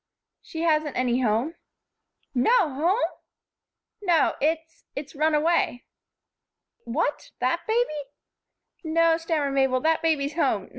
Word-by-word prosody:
"She 320 Hz, -, -7 dB
hasn't 305 Hz, -3 st, +1 dB
any 250 Hz, 0 st, +1 dB
home." 235 Hz, +7 st, +1 dB, 0.8 s
"No 355 Hz, -, +3 dB
home!" 345 Hz, -, +1 dB, 1.0 s
"No. 345 Hz, -6 st, +3 dB
It's 320 Hz, +2 st, -1 dB
it's 280 Hz, 0 st, -6 dB
run 305 Hz, +1 st, +2 dB
away." 300 Hz, -5 st, +1 dB, 1.0 s
"What! 290 Hz, +5 st, -2 dB
That 255 Hz, +7 st, -1 dB
baby?" 445 Hz, -10 st, 0 dB, 0.8 s
"No," 330 Hz, 0 st, +3 dB
stammered 315 Hz, -4 st, -1 dB
Mabel, 265 Hz, -1 st, +2 dB
"that 320 Hz, +2 st, +2 dB
baby's 300 Hz, -3 st, 0 dB
home. 330 Hz, -, 0 dB
310 Hz, 110 wpm, -25 LUFS, 275-330 Hz, 1.0 s, No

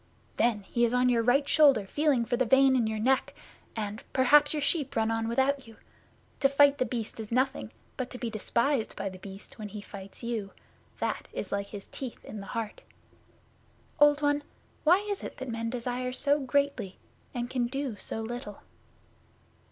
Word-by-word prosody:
'Then 230 Hz, -3 st, +2 dB
he 235 Hz, +4 st, -1 dB
is 235 Hz, +1 st, +3 dB
on 250 Hz, 0 st, +4 dB
your 235 Hz, -2 st, +3 dB
right 265 Hz, +5 st, +3 dB
shoulder 280 Hz, -9 st, +5 dB
feeling 280 Hz, +1 st, +1 dB
for 240 Hz, +1 st, 0 dB
the 255 Hz, -, +2 dB
vein 265 Hz, +2 st, +5 dB
in 235 Hz, -3 st, +2 dB
your 220 Hz, 0 st, -2 dB
neck, 260 Hz, +5 st, +1 dB, 0.4 s
and 210 Hz, 0 st, -4 dB
perhaps 290 Hz, +3 st, +6 dB
your 305 Hz, -, 0 dB
sheep 285 Hz, -1 st, 0 dB
run 225 Hz, 0 st, +2 dB
on 225 Hz, 0 st, -1 dB
without 265 Hz, +2 st, +1 dB
you. 225 Hz, -, -14 dB, 0.6 s
To 275 Hz, -, +4 dB
fight 280 Hz, 0 st, +5 dB
The 255 Hz, -, +1 dB
Beast 230 Hz, -1 st, -4 dB
is 220 Hz, 0 st, -7 dB
nothing, 260 Hz, +3 st, 0 dB, 0.3 s
but 255 Hz, -1 st, -3 dB
to 250 Hz, -, -7 dB
be 235 Hz, -2 st, -4 dB
despised 235 Hz, +3 st, 0 dB
by 195 Hz, -, -3 dB
The 185 Hz, -1 st, -11 dB
Beast 195 Hz, +2 st, -11 dB
when 210 Hz, -, -5 dB
he 210 Hz, +1 st, -7 dB
fights 200 Hz, 0 st, -10 dB
you 225 Hz, -4 st, -3 dB, 0.4 s
that -, -, -2 dB
is 195 Hz, -, -5 dB
like 200 Hz, 0 st, -1 dB
his 200 Hz, -1 st, -8 dB
teeth 260 Hz, -4 st, -7 dB
in 215 Hz, -, -7 dB
the 195 Hz, -, -8 dB
heart! 220 Hz, -2 st, -4 dB, 1.2 s
Old 295 Hz, 0 st, +5 dB
One, 290 Hz, 0 st, +2 dB, 0.4 s
why 365 Hz, +6 st, +5 dB
is 405 Hz, -1 st, -3 dB
it -, -, -7 dB
that 265 Hz, -1 st, -6 dB
men 230 Hz, 0 st, -2 dB
desire 250 Hz, +1 st, -3 dB
so 285 Hz, +3 st, +2 dB
greatly, 265 Hz, -7 st, 0 dB, 0.4 s
and 240 Hz, 0 st, -2 dB
can 245 Hz, -1 st, -1 dB
do 270 Hz, -2 st, -3 dB
so 225 Hz, -, -5 dB
little? 225 Hz, -2 st, -6 dB
245 Hz, 190 wpm, -29 LUFS, 220-275 Hz, 1.2 s, perhaps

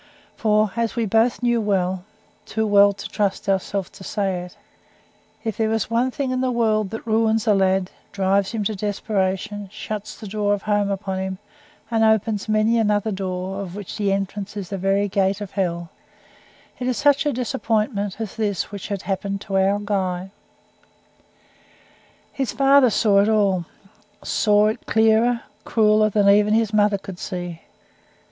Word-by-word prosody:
For, 215 Hz, -2 st, +2 dB
as 230 Hz, -3 st, -1 dB
we 230 Hz, -2 st, 0 dB
both 225 Hz, +4 st, +2 dB
knew 240 Hz, -1 st, +2 dB
well 190 Hz, -3 st, 0 dB, 0.4 s
too 220 Hz, 0 st, -1 dB
well 205 Hz, -1 st, +6 dB
to 200 Hz, -, -7 dB
trust 200 Hz, -1 st, -2 dB
ourselves 195 Hz, -1 st, -1 dB
to -, -, -13 dB
say 195 Hz, -3 st, -2 dB
it 180 Hz, -, -12 dB, 0.9 s
if 220 Hz, -3 st, -3 dB
there 220 Hz, -1 st, +1 dB
was 225 Hz, 0 st, -1 dB
one 240 Hz, +3 st, +2 dB
thing 265 Hz, 0 st, -3 dB
in 255 Hz, 0 st, -1 dB
the 260 Hz, -, +1 dB
world 220 Hz, -4 st, +1 dB
that 225 Hz, +2 st, -7 dB
ruins 225 Hz, 0 st, +2 dB
a 215 Hz, -, +4 dB
lad, 190 Hz, -1 st, +1 dB, 0.2 s
drives 195 Hz, 0 st, +1 dB
him 225 Hz, -3 st, -2 dB
to 215 Hz, -, -1 dB
desperation, 200 Hz, -1 st, -2 dB
shuts 210 Hz, -1 st, -6 dB
the 215 Hz, -, -8 dB
door 205 Hz, 0 st, 0 dB
of 200 Hz, -, -10 dB
home 205 Hz, -1 st, +1 dB
upon 195 Hz, -1 st, -3 dB
him, 190 Hz, 0 st, -3 dB, 0.5 s
and 225 Hz, -1 st, +2 dB
opens 220 Hz, -1 st, +1 dB
many 215 Hz, +2 st, +3 dB
another 210 Hz, 0 st, +1 dB
door, 190 Hz, 0 st, -4 dB
of 185 Hz, -2 st, -7 dB
which 205 Hz, -3 st, -7 dB
the 205 Hz, -2 st, 0 dB
entrance 195 Hz, +1 st, -3 dB
is 195 Hz, -3 st, -5 dB
the 195 Hz, -, -3 dB
very 195 Hz, +2 st, +1 dB
gate 195 Hz, 0 st, +1 dB
of 205 Hz, -2 st, -7 dB
hell 170 Hz, -3 st, -2 dB, 0.9 s
it 250 Hz, -, -2 dB
is 255 Hz, -, 0 dB
such 290 Hz, +1 st, +3 dB
a -, -, +2 dB
disappointment 215 Hz, -4 st, -1 dB
as 220 Hz, -4 st, -5 dB
this 205 Hz, -5 st, -1 dB
which 200 Hz, -2 st, -6 dB
had 200 Hz, -2 st, -4 dB
happened 200 Hz, 0 st, -2 dB
to 195 Hz, -, -5 dB
our 195 Hz, +1 st, +3 dB
Guy. 190 Hz, -3 st, -2 dB, 2.0 s
His 270 Hz, -3 st, -2 dB
father 275 Hz, -2 st, +5 dB
saw 205 Hz, -2 st, +3 dB
it 205 Hz, -, +2 dB
all. 200 Hz, -5 st, +2 dB, 0.6 s
Saw 210 Hz, -1 st, +3 dB
it 215 Hz, +2 st, -2 dB
clearer, 225 Hz, +2 st, +3 dB, 0.2 s
crueller, 215 Hz, -1 st, +3 dB
than 205 Hz, -1 st, +2 dB
even 210 Hz, +1 st, +5 dB
his 225 Hz, -1 st, +1 dB
mother 205 Hz, -1 st, +3 dB
could 190 Hz, -2 st, -10 dB
see. 175 Hz, -2 st, -5 dB
205 Hz, 170 wpm, -22 LUFS, 195-220 Hz, 2.0 s, well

